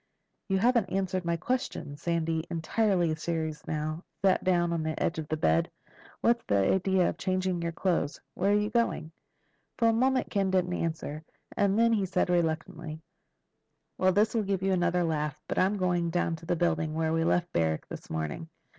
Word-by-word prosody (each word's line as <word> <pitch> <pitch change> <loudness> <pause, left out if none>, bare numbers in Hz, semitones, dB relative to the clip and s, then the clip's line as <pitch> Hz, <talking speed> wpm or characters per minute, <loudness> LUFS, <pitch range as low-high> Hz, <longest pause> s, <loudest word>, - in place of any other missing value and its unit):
"You 195 - +1
haven't 235 -1 +2
answered 185 -1 -1
my 170 0 0
question." 245 - -3
Sandy, 165 0 -1
entirely 175 0 +1
serious 160 -1 -3
now, 155 +2 -3 0.2
sat 190 -1 +3
down 175 -2 +2
on 165 - -1
the 155 0 -3
edge 165 - 0
of 155 - -5
the 155 - -1
bed. 80 - +2 0.5
"What's 235 0 +3
the 100 - +2 0.2
idea 190 -1 +2
of - - -3
changing 185 -2 0
your 170 0 -1
clothes? 165 -4 -1
Where 195 +2 +1
are 205 - +4
you 210 +1 -1
going?" 225 -9 0 0.7
For 230 -1 +4
a - - +3
moment 260 +3 +1
Ken 195 -2 +1
didn't 180 -1 +1
answer. 160 -3 -3 0.3
And 200 0 +2
then 230 0 +4
he 200 -4 +1
said 180 - +1
reluctantly, 160 -1 -1 1.0
"Well, 185 0 +4
this 205 +4 +2
will 230 - +2
give 195 -2 -1
you 195 - +2
another 175 0 +2
laugh. 150 -3 -1
But - - -1
I'm 195 +3 +2
going 175 -2 +1
down 170 -1 0
to 165 - -13
that 175 - +1
building 160 -2 0
where 160 0 0
we 165 0 +2
left 175 +1 +1
Barrack 80 -1 0
this - - -9
morning. 80 - -4
175 Hz, 190 wpm, -29 LUFS, 160-190 Hz, 1.0 s, are